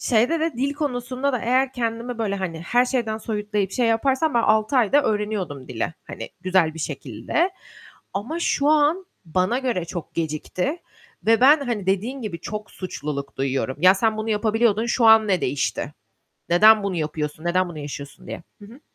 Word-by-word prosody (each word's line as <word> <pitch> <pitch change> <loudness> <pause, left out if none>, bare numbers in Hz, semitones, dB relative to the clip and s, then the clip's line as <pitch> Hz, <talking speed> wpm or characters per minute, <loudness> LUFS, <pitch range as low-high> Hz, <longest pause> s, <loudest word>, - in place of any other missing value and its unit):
Şeyde 250 +7 +2
de, 325 0 0
dil 275 +3 0
konusunda 260 -1 -2
da 250 - 0
eğer 255 +3 +1
kendimi 235 0 -3
böyle, 205 -3 -1
hani, 175 -4 -4
her 240 +8 +2
şeyden 235 -4 -1
soyutlayıp, 210 -3 -2
şey 245 +3 +1
yaparsam 265 +6 +1
ben 235 - +3
6 215 +4 +2
ayda 255 +4 +4
öğreniyordum 205 - -2
dili. 125 +6 -3
Hani, - - -7
güzel 185 -4 +2
bir 165 - -9
şekilde. 145 - -2 0.6
Ama 240 +13 -3
şu 285 -4 +1
an 310 +5 +3 0.2
bana 185 +8 0
göre 245 -10 -1
çok 170 -1 -7
gecikti 165 - -2 0.5
ve 225 0 +4
ben, 280 +5 +8
hani 235 -8 -3
dediğin 220 +8 -1
gibi 195 -6 -5
çok 210 +4 -6
suçluluk 145 -6 -6
duyuyorum. 135 0 -1
"Ya, 185 +2 +7
sen 220 +2 +1
bunu 220 +1 -3
yapabiliyordun, 220 +1 +2
şu 240 0 +1
an 220 -1 +7
ne 185 -3 +2
değişti? 140 +1 -2 0.6
Neden 215 +5 +6
bunu 195 -2 -2
yapıyorsun? 155 -1 -3
Neden 185 +1 +1
bunu 160 -3 -8
yaşıyorsun?" 140 -1 -8
diye. - - -7 0.2
Hı - - -10
hı. 230 +6 -14
215 Hz, 175 wpm, -23 LUFS, 175-245 Hz, 0.6 s, ben